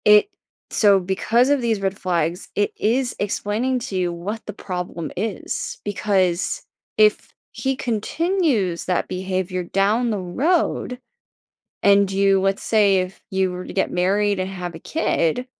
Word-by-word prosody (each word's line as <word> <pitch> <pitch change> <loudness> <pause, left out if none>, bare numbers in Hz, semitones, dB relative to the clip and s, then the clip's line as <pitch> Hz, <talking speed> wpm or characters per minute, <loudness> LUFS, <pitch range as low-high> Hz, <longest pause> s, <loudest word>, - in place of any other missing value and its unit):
It 210 - +6 0.4
so, 200 -3 +4
because 220 +7 +2
of 285 -1 +3
these 225 -4 0
red 195 0 -1
flags, 175 0 -1
it 205 - +1
is 245 +3 +1
explaining 215 +5 -1
to 215 -4 -6
you 175 -1 0
what 200 +6 -5
the 210 - -6
problem 180 -4 -5
is. 210 +1 -3
Because 190 -3 0 0.3
if 215 -1 +3 0.2
he 270 0 -1
continues 250 - 0
that 180 - 0
behavior 185 0 -2
down 210 +7 +1
the 210 - -1
road 250 - 0 0.9
and 200 -1 +5
you 195 0 +3
let's 195 +1 0
say, 205 -3 +4
if 185 +1 -5
you 190 -1 +1
were 180 0 -6
to - - -7
get 190 - +1
married 200 +2 +1
and 185 +1 -2
have 180 -2 -6
a - - -7
kid, 250 - 0
200 Hz, 150 wpm, -22 LUFS, 185-220 Hz, 0.9 s, It